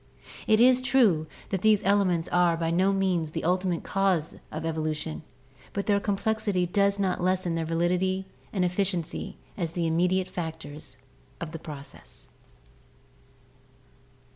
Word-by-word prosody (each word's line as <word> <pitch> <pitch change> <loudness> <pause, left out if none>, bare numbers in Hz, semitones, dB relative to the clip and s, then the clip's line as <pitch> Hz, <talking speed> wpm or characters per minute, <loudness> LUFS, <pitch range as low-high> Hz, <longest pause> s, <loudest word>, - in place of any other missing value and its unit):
It 215 0 +5
is 255 +1 +6
true 220 -12 +3 0.2
that 190 - -1
these 215 -1 +4
elements 190 -4 +2
are 175 -1 +3
by 165 0 -1
no 185 +3 +3
means 185 -5 +1
the - - -4
ultimate 180 0 0
causes 190 -5 0
of 155 +1 -4
evolution, 155 -1 -2 0.5
but 200 - -2
their 200 -1 +3
complexity 205 -2 0
does 200 +3 +2
not 190 -3 0
lessen 185 -1 +1
their 165 -1 -1
validity 180 +3 0 0.3
and 185 -3 +1
efficiency 180 -2 -2 0.2
as 170 -4 -3
the 170 -1 -1
immediate 180 +3 +2
factors 160 -6 -7 0.4
of 165 -2 -5
the 165 - -6
process." 140 - -11
180 Hz, 135 wpm, -27 LUFS, 165-195 Hz, 0.5 s, is